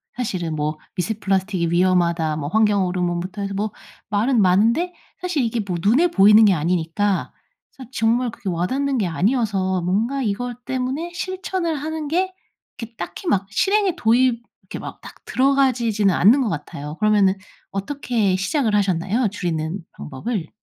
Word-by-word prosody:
사실은 180 Hz, -10 st, -3 dB
뭐 150 Hz, +1 st, -2 dB, 0.2 s
"미세 205 Hz, +5 st, -1 dB
플라스틱이 190 Hz, -3 st, 0 dB
위험하다." 170 Hz, -3 st, +2 dB
뭐 145 Hz, -1 st, -3 dB
환경 210 Hz, -1 st, +3 dB
호르몬부터 180 Hz, +1 st, -2 dB
해서 200 Hz, 0 st, -3 dB
뭐 210 Hz, +2 st, -2 dB, 0.4 s
말은 220 Hz, +3 st, +2 dB
많은데 230 Hz, -, +3 dB, 0.3 s
사실 345 Hz, -7 st, 0 dB
이게 230 Hz, -1 st, -1 dB
뭐 180 Hz, -3 st, -2 dB
눈에 255 Hz, -, +4 dB
보이는 210 Hz, -, +6 dB
게 195 Hz, -, +5 dB
아니니까 175 Hz, +4 st, 0 dB, 0.4 s
사실 260 Hz, -3 st, -12 dB
정말 235 Hz, +2 st, +1 dB
그게 195 Hz, -, -6 dB
와 175 Hz, +1 st, -1 dB
닿는 275 Hz, 0 st, -1 dB
게 200 Hz, -5 st, 0 dB
아니어서 190 Hz, -1 st, 0 dB
뭔가 225 Hz, +10 st, 0 dB
이것 245 Hz, +3 st, -3 dB
때문에 265 Hz, +6 st, -3 dB
실천을 365 Hz, -2 st, -3 dB
하는 310 Hz, +1 st, -4 dB
게 370 Hz, +4 st, 0 dB, 0.4 s
이게 230 Hz, 0 st, -8 dB
딱히 375 Hz, -, -6 dB
막 195 Hz, -5 st, +1 dB
실행에 390 Hz, -, +2 dB
도입 235 Hz, -2 st, +2 dB, 0.2 s
이렇게 -, -, -8 dB
막 -, -, -8 dB
딱 -, -, -11 dB
들어가지지는 245 Hz, -7 st, +2 dB
않는 240 Hz, +9 st, +5 dB
것 230 Hz, -, 0 dB
같아요. 150 Hz, -1 st, -6 dB
그러면은 205 Hz, -3 st, +3 dB, 0.4 s
어떻게 210 Hz, -2 st, -1 dB
시작을 210 Hz, +3 st, 0 dB
하셨나요 200 Hz, +4 st, +1 dB
줄이는 170 Hz, -2 st, -3 dB
방법을? 160 Hz, -, -5 dB
210 Hz, 350 characters per minute, -21 LUFS, 185-255 Hz, 0.4 s, 보이는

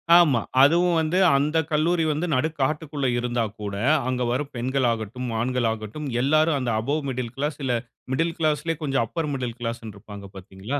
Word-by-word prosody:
ஆமா. 145 Hz, -10 st, +5 dB, 0.2 s
அதுவும் 170 Hz, +3 st, +4 dB
வந்து 160 Hz, +3 st, 0 dB, 0.2 s
அந்த 150 Hz, +3 st, +1 dB
கல்லூரி 165 Hz, +2 st, +2 dB
வந்து 155 Hz, +4 st, -1 dB
நடுக்காட்டுக்குள்ள 145 Hz, 0 st, -1 dB
இருந்தா 120 Hz, -1 st, -1 dB, 0.2 s
கூட, 100 Hz, -1 st, -4 dB, 0.3 s
அங்க 125 Hz, -1 st, -1 dB
வரும் 140 Hz, +3 st, -2 dB
பெண்கள் 130 Hz, +1 st, 0 dB
ஆகட்டும், 115 Hz, +3 st, -4 dB
ஆண்கள் 125 Hz, 0 st, 0 dB
ஆகட்டும் 110 Hz, +7 st, -6 dB
எல்லாரும் 155 Hz, +2 st, +3 dB
அந்த 120 Hz, -2 st, -1 dB
அபௌவ் 145 Hz, +6 st, -1 dB
மிடில் 125 Hz, -2 st, -4 dB
கிளாஸ், 145 Hz, +2 st, -2 dB
இல்லை 125 Hz, -2 st, +1 dB, 0.3 s
மிடில் 165 Hz, +5 st, 0 dB
கிளாஸ்லயே 155 Hz, +1 st, 0 dB
கொஞ்சம் 135 Hz, -4 st, +1 dB
அப்பர் 165 Hz, -3 st, -3 dB
மிடில் 125 Hz, -3 st, -4 dB
கிளாஸ் 115 Hz, 0 st, -4 dB
ன்னு 105 Hz, -2 st, -8 dB
இருப்பாங்க, 100 Hz, 0 st, -10 dB
பார்த்தீங்களா? 95 Hz, +9 st, -5 dB
135 Hz, 165 wpm, -24 LUFS, 120-155 Hz, 0.3 s, ஆமா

